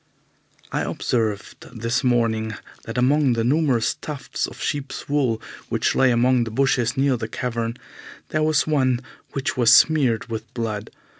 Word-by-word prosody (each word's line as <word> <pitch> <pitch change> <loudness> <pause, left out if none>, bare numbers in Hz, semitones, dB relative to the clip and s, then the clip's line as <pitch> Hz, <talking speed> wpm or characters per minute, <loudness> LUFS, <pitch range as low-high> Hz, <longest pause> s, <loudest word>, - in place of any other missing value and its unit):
I - - -1
observed 115 +1 -3
this 115 +5 0
morning 115 -3 +1 0.3
that 115 - -6
among 135 +1 +3
the 115 -1 0
numerous 130 -3 +2
tufts 145 -4 -4
of - - -12
sheep's 145 -1 -4
wool 135 -6 +1 0.3
which - - +1
lay 130 - +4
among 125 +1 +3
the 115 - -4
bushes 125 0 +1
near 135 -1 +2
the 110 -1 -4
cavern 115 0 -3 0.5
there 155 - 0
was 155 -1 +2
one 130 -5 +1 0.3
which 135 - -2
was 120 -2 +4
smeared 130 -7 +4
with 115 -2 -6
blood. 110 -2 -3
125 Hz, 150 wpm, -23 LUFS, 115-135 Hz, 0.5 s, lay